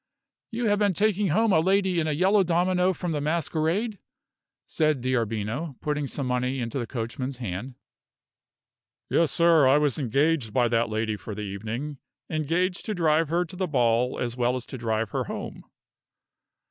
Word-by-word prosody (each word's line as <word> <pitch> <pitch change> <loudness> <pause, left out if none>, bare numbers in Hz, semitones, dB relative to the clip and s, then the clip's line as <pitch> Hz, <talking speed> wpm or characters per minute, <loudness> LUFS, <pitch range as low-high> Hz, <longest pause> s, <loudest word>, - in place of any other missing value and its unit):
"You 235 0 -3
have 205 -1 +2
been 200 -3 +2
taking 210 0 +2
home 220 +6 +2
a 160 - +5
lady 190 +1 +2
in 155 - 0
a - - +1
yellow 190 +6 +3
domino 180 +1 +2
from 175 -1 -4
the 150 -2 -1
masquerade?" 170 - -1 0.7
said 155 -3 +1
D'Arbino, 120 +3 -2
putting 150 -1 -2
some 140 0 -4
money 125 +1 -1
into 120 +2 -3
the 120 - -3
coachman's 125 +2 -4
hand. 120 +2 -5 1.4
"Yes, 165 -2 +3
sir; 165 -4 +5
I 135 +2 +5
was 150 -2 +1
engaged 140 -2 +1
by 120 -2 +3
that 115 0 +1
lady 110 0 -1
for 105 0 -7
the 105 - -5
evening 110 +8 -5 0.3
engaged 170 +4 0
to 215 - -1
drive 160 -2 +2
her 175 +2 +1
to 170 - -11
the 185 0 -1
ball 125 -3 +1
as 120 -1 -2
well 125 0 +1
as 125 -1 -5
to 130 - -7
drive 110 -2 -1
her - - -1
home." - - -7
150 Hz, 170 wpm, -26 LUFS, 120-175 Hz, 1.4 s, a